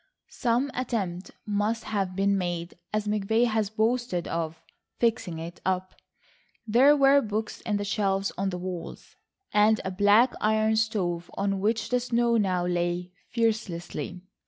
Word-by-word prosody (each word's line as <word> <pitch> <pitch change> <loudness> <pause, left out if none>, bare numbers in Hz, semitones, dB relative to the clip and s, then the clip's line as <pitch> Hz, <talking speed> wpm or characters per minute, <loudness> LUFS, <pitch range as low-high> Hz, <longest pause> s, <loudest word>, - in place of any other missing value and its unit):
Some 250 +3 0
attempt 200 -8 -3 0.2
must 210 +2 0
have 195 -3 -2
been 200 +1 +2
made, 175 -2 -2 0.2
as 215 0 -1
McVay 215 +3 +2
had 220 -3 0
boasted, 225 -5 0
of 165 -1 -3 0.3
"fixing 225 -8 0
it 165 +2 -8
up"; 185 0 -1 0.7
there 260 +7 +5
were 275 0 +6
books 215 -1 -3
in 210 -2 +1
the 205 - -3
shelves 195 -1 0
on 195 +1 -1
the 180 - -4
walls, 180 -1 -7 0.4
and 215 +1 +4
a 190 - -2
black 205 +6 +4
iron 220 +1 +2
stove 185 -6 -1
on 195 0 0
which 215 +2 0
the 250 - +2
snow 240 -1 +1
now 185 -4 +1
lay 175 0 -1 0.2
fearlessly. 215 -6 -2
205 Hz, 145 wpm, -27 LUFS, 185-225 Hz, 0.7 s, were